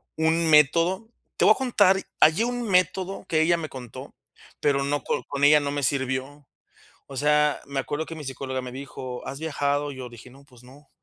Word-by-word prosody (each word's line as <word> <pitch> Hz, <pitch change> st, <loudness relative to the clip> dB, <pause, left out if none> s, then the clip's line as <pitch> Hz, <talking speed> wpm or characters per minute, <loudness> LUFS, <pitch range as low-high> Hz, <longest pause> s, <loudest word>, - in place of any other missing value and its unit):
un 160 Hz, +1 st, +1 dB
método. 165 Hz, +8 st, +3 dB, 0.3 s
Te -, -, +1 dB
voy -, -, +7 dB
a -, -, -11 dB
contar, 205 Hz, -7 st, +3 dB, 0.2 s
hallé 160 Hz, +9 st, +5 dB
un 245 Hz, 0 st, -3 dB
método 185 Hz, +1 st, 0 dB
que 155 Hz, -1 st, +2 dB
ella 170 Hz, +2 st, +3 dB
me 160 Hz, -2 st, -5 dB
contó, 125 Hz, -3 st, -10 dB, 0.5 s
pero 140 Hz, -1 st, +2 dB
no 145 Hz, -1 st, -1 dB
co -, -, -2 dB
con 140 Hz, 0 st, -4 dB
ella 150 Hz, +1 st, +7 dB
no 145 Hz, -1 st, -3 dB
me 145 Hz, 0 st, -3 dB
sirvió. 135 Hz, +2 st, -2 dB, 0.6 s
O 135 Hz, -, -10 dB
sea, 150 Hz, 0 st, +2 dB
me 140 Hz, -1 st, -2 dB
acuerdo 150 Hz, +4 st, -4 dB
que 165 Hz, -, -7 dB
mi 155 Hz, -2 st, -8 dB
psicóloga 130 Hz, 0 st, -4 dB
me 125 Hz, -, -8 dB
dijo: 130 Hz, -2 st, -8 dB
"¿Has 135 Hz, -, -6 dB
viajado?", 145 Hz, -2 st, -1 dB
y -, -, -11 dB
yo 130 Hz, -, -7 dB
le 120 Hz, -, -20 dB
dije: 120 Hz, +2 st, -13 dB
"No, 135 Hz, +2 st, -17 dB
pues 125 Hz, -3 st, -19 dB
no", 135 Hz, +3 st, -17 dB
145 Hz, 210 wpm, -25 LUFS, 135-165 Hz, 0.6 s, voy